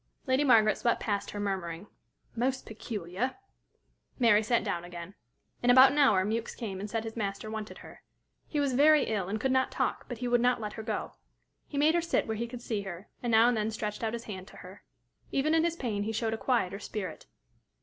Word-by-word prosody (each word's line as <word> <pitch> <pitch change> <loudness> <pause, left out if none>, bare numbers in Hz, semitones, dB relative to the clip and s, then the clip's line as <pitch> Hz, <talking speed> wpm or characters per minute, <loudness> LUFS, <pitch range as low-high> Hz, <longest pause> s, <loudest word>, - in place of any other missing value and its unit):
Lady 260 +1 +2
Margaret 220 -6 +5
swept 235 - +1
past 205 -2 -2
her, 205 - -6
murmuring, 190 -3 -3 0.5
"Most 260 +3 -1
peculiar!" 215 +1 -4 0.8
Mary 230 -4 +5
sat 235 +2 +1
down 175 -5 -2
again. 175 +1 -8 0.5
In 245 - +1
about 260 +2 +8
an 295 - 0
hour, 210 -10 +5
Mewks 225 +2 -2
came 195 -5 -5
and 205 +2 -5
said 225 +1 -2
his 225 0 -6
master 205 0 -3
wanted 220 -1 -6
her. - - -13 0.5
He 300 - -2
was 280 -2 +1
very 295 +3 +6
ill, 200 -4 -2
and 215 +2 -2
could 265 +4 0
not 260 0 +2
talk, - - -2
but 245 - -5
he 245 +2 -3
would 240 0 +3
not 250 0 +3
let 210 -2 -5
her 220 - -6
go. 215 - -3 0.6
He 285 - -6
made 300 +3 +4
her 345 - +2
sit 335 - 0
where 220 - -2
he 235 +2 -3
could 240 0 -9
see 215 -3 -2
her, 190 -1 -8
and 240 - -2
now 225 +1 +6
and 245 - +3
then 215 0 0
stretched 215 0 -4
out 220 0 -1
his 235 0 -4
hand 190 -4 -7
to - - -14
her. 185 +2 -12 0.5
Even 300 +3 +1
in 325 0 +4
his 335 -1 0
pain 225 -10 -2
he 215 +2 -2
showed 225 0 -1
a - - 0
quieter 205 -6 0
spirit. 195 -5 -6
220 Hz, 225 wpm, -30 LUFS, 205-250 Hz, 0.8 s, about